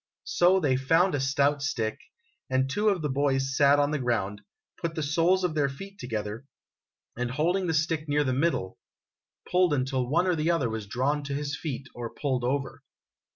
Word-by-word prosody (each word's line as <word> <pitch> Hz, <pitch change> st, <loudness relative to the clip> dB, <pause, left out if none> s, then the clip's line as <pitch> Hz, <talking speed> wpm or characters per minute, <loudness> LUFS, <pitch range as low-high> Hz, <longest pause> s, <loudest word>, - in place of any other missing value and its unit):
So 180 Hz, +2 st, +4 dB
they 135 Hz, -7 st, +2 dB
found 165 Hz, +8 st, +3 dB
a 145 Hz, -, 0 dB
stout 140 Hz, +2 st, +1 dB
stick, 120 Hz, -3 st, -2 dB, 0.5 s
and 130 Hz, 0 st, +2 dB
two 205 Hz, +9 st, +1 dB
of 185 Hz, -6 st, 0 dB
the -, -, +1 dB
boys 135 Hz, -1 st, 0 dB
sat 140 Hz, 0 st, +5 dB
on 145 Hz, 0 st, +2 dB
the 150 Hz, -, -1 dB
ground, 105 Hz, -5 st, -1 dB, 0.4 s
put 165 Hz, -1 st, -4 dB
the 155 Hz, -, -2 dB
soles 170 Hz, +5 st, +2 dB
of 180 Hz, -3 st, 0 dB
their 145 Hz, -3 st, +1 dB
feet 195 Hz, +9 st, -10 dB
together, 110 Hz, +1 st, -5 dB, 0.7 s
and, 120 Hz, +1 st, -2 dB
holding 175 Hz, +8 st, 0 dB
the 165 Hz, -, 0 dB
stick 155 Hz, 0 st, 0 dB
near 145 Hz, +1 st, +2 dB
the 130 Hz, -2 st, 0 dB
middle, 135 Hz, -, -1 dB, 0.7 s
pulled 180 Hz, -4 st, +3 dB
until 130 Hz, -2 st, -1 dB
one 170 Hz, +6 st, +2 dB
or 180 Hz, -, +2 dB
the 155 Hz, +1 st, 0 dB
other 140 Hz, -9 st, +1 dB
was 110 Hz, -2 st, -5 dB
drawn 135 Hz, +7 st, 0 dB
to 140 Hz, 0 st, -3 dB
his 145 Hz, 0 st, -3 dB
feet 140 Hz, -4 st, -5 dB
or 120 Hz, -1 st, -5 dB
pulled 130 Hz, -4 st, -1 dB
over. 135 Hz, +2 st, -2 dB
145 Hz, 195 wpm, -27 LUFS, 130-165 Hz, 0.7 s, sat